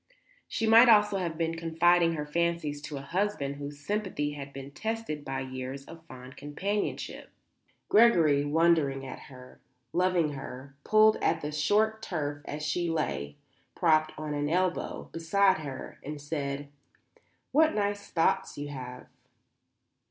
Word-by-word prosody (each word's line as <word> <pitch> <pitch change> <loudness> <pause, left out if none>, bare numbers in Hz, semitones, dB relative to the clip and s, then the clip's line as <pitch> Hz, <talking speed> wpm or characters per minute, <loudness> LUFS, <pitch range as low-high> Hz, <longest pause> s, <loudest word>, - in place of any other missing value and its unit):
She 225 - -2
might 230 +2 +8
almost 210 -2 +6
have 175 -5 -2
been 165 0 0
confiding 165 +1 +3
her 150 -1 -3
fancies 165 -2 -1
to 145 0 -6
a - - -6
husband 165 -4 -2
whose 145 0 -7
sympathy 190 -8 -1
had 140 -1 -7
been 135 0 -9
tested 220 -5 -4
by 135 -1 -3
years 130 +1 -6
of 165 +2 -12
fond 130 -1 -11
companionship. 195 +8 -3 0.6
Gregory, 165 -11 +5
wondering 145 -3 +2
at 130 - -7
her, 125 -1 -14 0.3
loving 175 -4 +2
her, 135 0 -8
pulled 215 0 +5
at 165 0 0
the 150 - -4
short 210 +9 +1
turf 145 -7 -3
as 150 0 -3
he 175 -1 -1
lay, 110 - -2 0.4
propped 155 -2 +3
on 155 -1 -4
an 145 0 -1
elbow, 180 +2 -1
beside 190 +3 +2
her, 140 -4 -7
and 150 +1 -6
said: 145 -1 -4 0.8
"What 315 +3 +4
nice 205 -1 -1
thoughts 165 -1 +1
you 145 0 -5
have." 125 -3 -8
155 Hz, 145 wpm, -29 LUFS, 145-185 Hz, 0.8 s, might